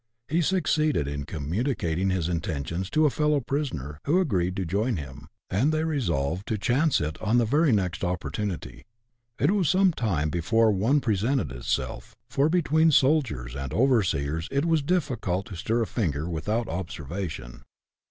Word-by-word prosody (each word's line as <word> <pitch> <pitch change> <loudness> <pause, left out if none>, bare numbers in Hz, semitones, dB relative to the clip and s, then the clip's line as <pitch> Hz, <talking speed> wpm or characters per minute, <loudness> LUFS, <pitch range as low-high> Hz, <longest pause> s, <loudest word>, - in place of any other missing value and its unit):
He 165 +4 +1
succeeded 155 - +1
in 70 0 -4
communicating 90 - -1
his 90 -3 0
intentions 85 +1 -3
to 155 +5 +3
a 150 - +3
fellow 150 0 +2
prisoner, 115 - -3
who 165 +6 +3
agreed 95 - 0
to 95 - -2
join 105 +6 0
him, 70 0 -8 0.2
and 125 +11 +1
they 155 0 0
resolved 90 - -1
to 110 - -1
"chance 130 +8 +2
it" 75 -1 -4
on 110 +3 +2
the 120 - +4
very 145 +6 +3
next 95 -5 0
opportunity. 90 - -4 0.5
It 145 - +3
was 195 -7 +2
some 190 -1 +4
time 85 - -1
before 110 +6 +3
one 115 +9 +2
presented 115 - 0
itself, - - -3 0.2
for 140 +4 +2
between 160 -2 +3
soldiers 130 - +2
and 70 -1 -5
overseers 85 - +1
it 140 +3 0
was 165 -2 +2
difficult 130 - -1
to 95 - -7
stir 115 +7 0
a - - -1
finger 80 - -2
without 105 +8 -2
observation. 80 -6 -5
105 Hz, 160 wpm, -26 LUFS, -, 0.5 s, the